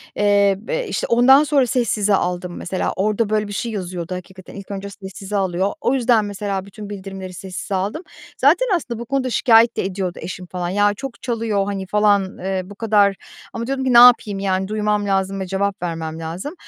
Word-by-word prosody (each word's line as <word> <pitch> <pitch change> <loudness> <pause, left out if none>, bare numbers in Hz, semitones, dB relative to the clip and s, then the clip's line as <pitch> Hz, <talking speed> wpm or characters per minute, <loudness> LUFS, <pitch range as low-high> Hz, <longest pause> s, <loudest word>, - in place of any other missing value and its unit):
eee, 200 -1 +3
be - - -3
işte, - - -2
ondan 260 +5 +6
sonra 280 -4 +2
sessize 215 -4 +1
aldım 180 -1 -2
mesela, 185 +1 -2
orada, 210 +2 0
böyle, 215 -1 0
bir 205 - -7
şey 230 +3 -3
yazıyordu 180 -3 -5
hakikaten, 185 0 -11
ilk 200 0 -9
önce 200 0 -5
sessize 195 0 -8
alıyor. 190 0 0
O 255 - +1
yüzden, 240 -4 +3
mesela 200 -1 -3
bütün 205 +1 -10
bildirimleri 195 -2 -7
sessize 190 +2 -5
aldım. 200 - -2 0.3
Zaten - - +4
aslında 240 -9 -4
bu 235 - -6
konuda 265 0 -1
şikâyet 230 0 +4
de - - 0
ediyordu 185 -2 -3
eşim, 185 0 -6
falan. 180 -1 -4
"Ya, 205 +2 +2
çok 260 +4 -8
çalıyor, 225 -5 -1
hani" 195 -1 -4
falan, 205 -2 +2
eee, 190 0 -2
bu 205 +2 -12
kadar 205 -2 +3 0.4
ama 230 0 -4
diyordum 265 0 -2
ki, 255 - +2
"Ne - - +7
yapayım, 235 -5 +7
yani, 190 -1 -1
duymam 210 0 0
lazım 195 0 0
ve 190 - -4
cevap 200 +2 -2
vermem 165 -2 -4
lazım." 170 - -5
200 Hz, 195 wpm, -20 LUFS, 190-225 Hz, 0.4 s, Ne